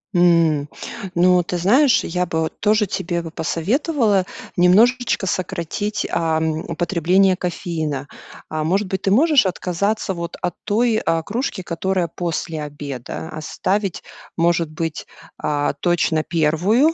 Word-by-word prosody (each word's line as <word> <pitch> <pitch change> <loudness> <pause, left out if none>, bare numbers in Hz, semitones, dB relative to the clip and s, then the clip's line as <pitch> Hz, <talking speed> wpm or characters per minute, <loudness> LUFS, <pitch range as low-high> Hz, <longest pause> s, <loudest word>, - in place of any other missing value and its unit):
М. 165 -4 +3 0.5
Ну, 180 +1 +4
ты 180 +1 -3
знаешь, 245 - +4
я 180 +1 -1
бы 160 -1 -1
вот 160 - -4
тоже 210 0 +3
тебе 175 -1 -2
бы 165 - -7
посоветовала 210 - +1 0.3
немножечко 215 +5 +3
сократить, 190 +3 -2
ам, 160 -1 0
употребление 175 +3 +2
кофеина. 160 -6 -3 0.4
Э, 155 0 -2
может 190 +6 +1
быть, 190 0 -3
ты 195 - +1
можешь 285 +2 +5
отказаться 190 +3 -1
вот 170 -1 -6
от 175 - -1
той, 220 +1 +1
э, 165 0 +1
кружки, 225 -2 -3
которая 180 +1 -1
после 165 -2 -3
обеда. 145 0 -6
Оставить, 185 +5 -2 0.4
может 170 -1 +2
быть, 160 0 -4 0.4
э, 145 -1 0
точно 170 -2 +1
1, 175 - +2
175 Hz, 130 wpm, -20 LUFS, 160-200 Hz, 0.5 s, можешь